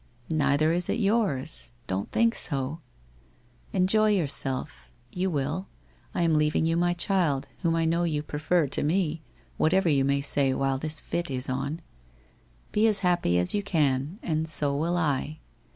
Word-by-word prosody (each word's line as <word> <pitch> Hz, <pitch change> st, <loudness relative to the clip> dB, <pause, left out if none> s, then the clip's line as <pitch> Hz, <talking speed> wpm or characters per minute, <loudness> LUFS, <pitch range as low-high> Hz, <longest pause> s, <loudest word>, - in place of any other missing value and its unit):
Neither 155 Hz, +1 st, +2 dB
is 175 Hz, 0 st, -1 dB
it -, -, +1 dB
yours. 140 Hz, -, 0 dB
Don't 95 Hz, +2 st, -3 dB
think 230 Hz, 0 st, +3 dB
so. 140 Hz, -, -3 dB, 0.9 s
Enjoy 210 Hz, +3 st, +3 dB
j 190 Hz, -, +2 dB
ourself. 135 Hz, -, -1 dB, 0.2 s
You 185 Hz, +1 st, -1 dB
will. 150 Hz, +4 st, -2 dB, 0.5 s
I 175 Hz, -, +1 dB
am 165 Hz, -1 st, +2 dB
leaving 150 Hz, +1 st, +2 dB
you 165 Hz, 0 st, +1 dB
my 175 Hz, +1 st, +1 dB
child, 170 Hz, -7 st, +1 dB
whom 165 Hz, -3 st, +1 dB
I 165 Hz, 0 st, +1 dB
know 170 Hz, +2 st, +1 dB
you 150 Hz, -3 st, -1 dB
prefer 155 Hz, +3 st, 0 dB
to 140 Hz, -, -2 dB
me, 165 Hz, 0 st, 0 dB, 0.4 s
whatever 180 Hz, +2 st, +3 dB
you 140 Hz, -3 st, +3 dB
may 140 Hz, +1 st, +1 dB
say 140 Hz, -1 st, +1 dB
while 135 Hz, -1 st, 0 dB
this 155 Hz, +1 st, -2 dB
fit 175 Hz, -1 st, -3 dB
is 130 Hz, 0 st, -3 dB
on. 140 Hz, +5 st, -3 dB, 0.9 s
Be 215 Hz, +2 st, +3 dB
as 205 Hz, -3 st, +1 dB
happy 175 Hz, -, +2 dB
as 90 Hz, 0 st, +1 dB
you 205 Hz, -, +1 dB
can, 150 Hz, -4 st, 0 dB
and 160 Hz, -1 st, -1 dB
so 145 Hz, -2 st, +1 dB
will 170 Hz, +4 st, 0 dB
I. 150 Hz, -2 st, -1 dB
155 Hz, 170 wpm, -27 LUFS, 140-175 Hz, 0.9 s, think